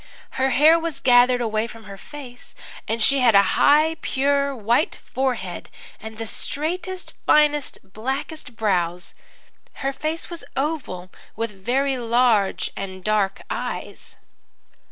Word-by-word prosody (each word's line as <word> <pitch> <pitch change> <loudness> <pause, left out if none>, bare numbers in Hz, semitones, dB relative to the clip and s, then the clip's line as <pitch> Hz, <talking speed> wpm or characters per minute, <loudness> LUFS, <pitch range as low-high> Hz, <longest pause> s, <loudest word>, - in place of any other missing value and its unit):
Her 265 0 +1
hair 310 +5 +6
was 330 -2 -4
gathered 245 0 +5
away 220 -1 0
from 225 -1 -12
her 200 -1 -9
face, 250 +2 -10 0.3
and 225 0 0
she 275 +3 +5
had 240 -4 +5
a 200 - +8
high, 310 +3 +4
pure, 280 +1 +1
white 235 +6 +1 0.2
forehead, 245 -9 -2 0.3
and 220 0 -9
the 225 - -4
straightest, 355 - -3
finest, 295 -1 +3
blackest 255 - -5
brows. 180 -5 -1 0.7
Her 275 - +1
face 310 +4 -3
was 340 - -6
oval, 265 - -3 0.2
with 230 0 -3
very 255 +7 -1
large 230 -5 +2
and 190 -1 -6
dark 205 -2 0
eyes. - - -5
245 Hz, 130 wpm, -23 LUFS, 215-285 Hz, 0.7 s, a